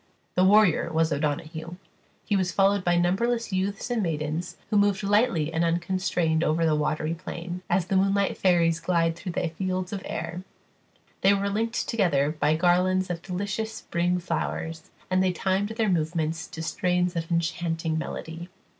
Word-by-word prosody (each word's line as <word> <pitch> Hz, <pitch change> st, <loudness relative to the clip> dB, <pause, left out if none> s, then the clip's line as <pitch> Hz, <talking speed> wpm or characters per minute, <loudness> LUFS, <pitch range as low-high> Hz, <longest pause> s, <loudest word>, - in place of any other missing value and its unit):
The 180 Hz, -, +3 dB
warrior 195 Hz, -4 st, +4 dB
was 160 Hz, -1 st, +2 dB
O'Donoghue; 155 Hz, +3 st, -3 dB, 0.5 s
he 205 Hz, -, +1 dB
was 185 Hz, -2 st, +1 dB
followed 195 Hz, +1 st, +3 dB
by 175 Hz, -1 st, +2 dB
numberless 210 Hz, +6 st, +1 dB
youths 195 Hz, +5 st, -2 dB
and 235 Hz, -2 st, +1 dB
maidens, 160 Hz, 0 st, -3 dB
who 210 Hz, -, +3 dB
moved 200 Hz, -1 st, +2 dB
lightly 200 Hz, -6 st, +2 dB
and 165 Hz, +1 st, +1 dB
unconstrained 170 Hz, -1 st, 0 dB
over 165 Hz, +1 st, +2 dB
the 160 Hz, -, +3 dB
watery 155 Hz, +1 st, 0 dB
plain, 175 Hz, +1 st, -6 dB
as 175 Hz, 0 st, +2 dB
the 195 Hz, +1 st, -1 dB
moonlight 195 Hz, +1 st, +2 dB
fairies 170 Hz, -3 st, +3 dB
glide 165 Hz, -1 st, +1 dB
through 175 Hz, +1 st, -6 dB
the 170 Hz, -, -1 dB
fields 185 Hz, +2 st, -3 dB
of 195 Hz, -, -3 dB
air; 175 Hz, +2 st, -4 dB, 0.8 s
they 195 Hz, +1 st, +5 dB
were 200 Hz, 0 st, -1 dB
linked 225 Hz, +3 st, -1 dB
together 150 Hz, -10 st, +2 dB
by 155 Hz, 0 st, +1 dB
garlands 180 Hz, +2 st, +2 dB
of 170 Hz, -1 st, -4 dB
delicious 200 Hz, +4 st, -3 dB
spring 175 Hz, -3 st, -1 dB
flowers, 165 Hz, -2 st, -3 dB, 0.2 s
and 185 Hz, 0 st, +3 dB
they 185 Hz, -1 st, +2 dB
timed 190 Hz, +3 st, 0 dB
their 225 Hz, 0 st, 0 dB
movements 165 Hz, -2 st, -1 dB
to 160 Hz, -, -7 dB
strains 180 Hz, +2 st, 0 dB
of 165 Hz, -1 st, -3 dB
enchanting 165 Hz, -1 st, -1 dB
melody. 165 Hz, +2 st, -6 dB
175 Hz, 165 wpm, -26 LUFS, 165-195 Hz, 0.8 s, they